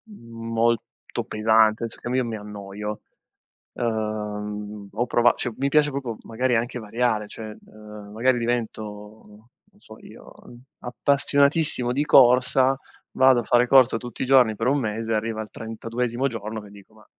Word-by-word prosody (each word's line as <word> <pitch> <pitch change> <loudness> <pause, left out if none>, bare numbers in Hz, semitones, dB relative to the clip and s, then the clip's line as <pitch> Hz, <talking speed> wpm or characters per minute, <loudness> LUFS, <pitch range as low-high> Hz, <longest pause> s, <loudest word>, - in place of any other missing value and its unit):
molto 115 - -3
pesante, 110 +1 +2
cioè - - -17
che - - -6
io 130 - +2
mi 115 -1 -4
annoio, 105 0 -7 0.7
ehm, 105 -2 -4
ho 115 +4 -1
prova 120 0 +3
cioè 120 - -3
mi 140 +1 0
piace 150 0 +3
proprio 130 -5 -4
magari 125 +2 -1
anche 120 +2 -2
variare, 110 -1 -1
cioè 110 +1 -8 0.2
ehm, 105 -1 -12
magari 125 +3 +2
divento, 120 -2 -2 0.9
non 205 - -27
so 110 - -14
io, - - -14 0.5
appassionatissimo 140 +1 +1
di 140 +4 0
corsa, 130 0 +5 0.3
vado 130 -2 +4
a - - -9
fare 120 +2 +3
corsa 130 -3 +5
tutti 120 0 -8
i - - -1
giorni 125 -4 +4
per 115 +3 -2
un 140 +2 +2
mese, 115 -1 -3
arriva 110 0 -2
al 105 - -8
trentaduesimo 115 +3 -3
giorno 110 -3 -6
che 105 - -14
dico: 100 +1 -17
"Ma, 110 -1 -20
115 Hz, 155 wpm, -24 LUFS, 110-125 Hz, 0.9 s, corsa